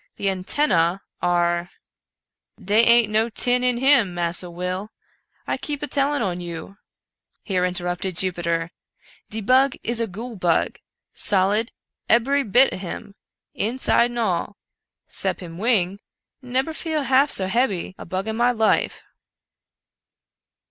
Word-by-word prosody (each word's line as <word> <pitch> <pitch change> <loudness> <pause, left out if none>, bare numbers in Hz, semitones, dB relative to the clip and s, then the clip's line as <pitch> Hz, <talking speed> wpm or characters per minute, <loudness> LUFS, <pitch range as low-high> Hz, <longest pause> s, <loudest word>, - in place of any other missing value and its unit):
The 200 - -1
antennae 185 - +1 0.2
are 175 0 +1 0.3
" - - -66
" - - -38
Dey 215 +2 +6
ain't 235 -2 +5
no 220 +2 +2
tin 245 +2 +1
in 250 -1 +2
him, 250 -8 +4
Massa 175 +1 -1
Will, 180 +4 -4 0.6
I - - -2
keep 290 -2 -5
a - - -2
tellin' 285 -1 0
on 180 -3 -2
you," 170 +3 -8 0.7
here 185 -3 -1
interrupted 180 0 -2
Jupiter; 170 -2 -1 0.3
" - - -28
de 220 +1 -3
bug 260 +5 +3
is 235 +1 -2
a 230 - 0
goole 225 +4 -8
bug, 175 -3 0 0.3
solid, 205 +3 +1 0.4
ebery 275 +5 +3
bit 250 +5 +5
of - - -5
him, 190 +2 -7 0.4
inside 235 +1 +2
and 240 - -7
all, 205 -2 -1 0.5
sep - - 0
him 170 -2 -9
wing 200 -4 +1 0.2
— - - -48
nebcr 265 +5 -1
feel 315 -3 -2
half 270 +2 +3
so 190 - +3
hebby 200 -4 0
a - - -7
bug 185 +4 -3
in 220 - -2
my 240 +2 +3
life." 220 -2 +1
210 Hz, 150 wpm, -22 LUFS, 180-245 Hz, 0.7 s, Dey